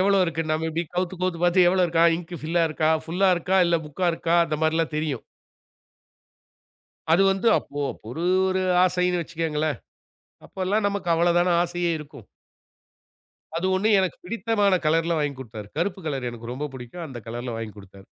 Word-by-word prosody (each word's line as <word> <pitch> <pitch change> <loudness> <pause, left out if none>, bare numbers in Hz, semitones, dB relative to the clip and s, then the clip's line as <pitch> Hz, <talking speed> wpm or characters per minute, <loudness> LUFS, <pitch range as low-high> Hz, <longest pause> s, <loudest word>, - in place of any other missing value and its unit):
எவளோ 195 +1 +4
இருக்கு. 165 -1 -2
நம்ம 155 +1 0
இப்பிடி 165 +2 -2
கவுத்து, 180 0 -1
கவுத்து 180 -2 0
பார்த்து 175 0 +5
எவளோ 185 0 +3
இருக்கா? 165 0 +3
இங்க் 175 0 -9
ஃபில்லா 165 +2 +1
இருக்கா? 155 0 +1
ஃபுல்லா 185 +4 +1
இருக்கா? 190 +3 0
இல்ல 170 0 +3
முக்கா 175 +5 -2
இருக்கா? 165 0 -1
அந்த 155 -1 -2
மாரிலாம் 160 0 +1
தெரியும். 150 -6 -2 1.9
அது 185 +4 +5
வந்து 195 +4 +1
அப்போ 145 0 -7 0.3
ஒரு, 160 +8 -4 0.2
ஒரு 185 0 0 0.2
ஆசைன்னு 180 -1 +1
வச்சுக்கங்களேன்! 155 -4 -2 0.7
அப்பல்லாம் 200 +2 -1
நமக்கு 200 -3 -4
அவ்வள 170 +1 +2
தான 180 - +2
ஆசையே 175 0 -1
இருக்கும். 150 -2 -12 1.3
அது 170 +3 -1
ஒண்ணு 210 +3 +1
எனக்குப் 185 -3 -3
பிடித்தமான 205 0 +1
கலர்ல 165 +2 +2
வாங்கிக் 145 -3 -2
கொடுத்தாரு. 110 -4 -9
கருப்பு 190 +1 -1
கலர் 135 -5 -2
எனக்கு 120 0 -8
ரொம்ப 150 +3 -4
பிடிக்கும். 130 +7 -8
அந்த 130 -5 -8
கலர்ல 120 +1 -5
வாங்கிக் 110 -2 -6
கொடுத்தாரு. 95 0 -15
165 Hz, 160 wpm, -24 LUFS, 150-180 Hz, 1.9 s, பார்த்து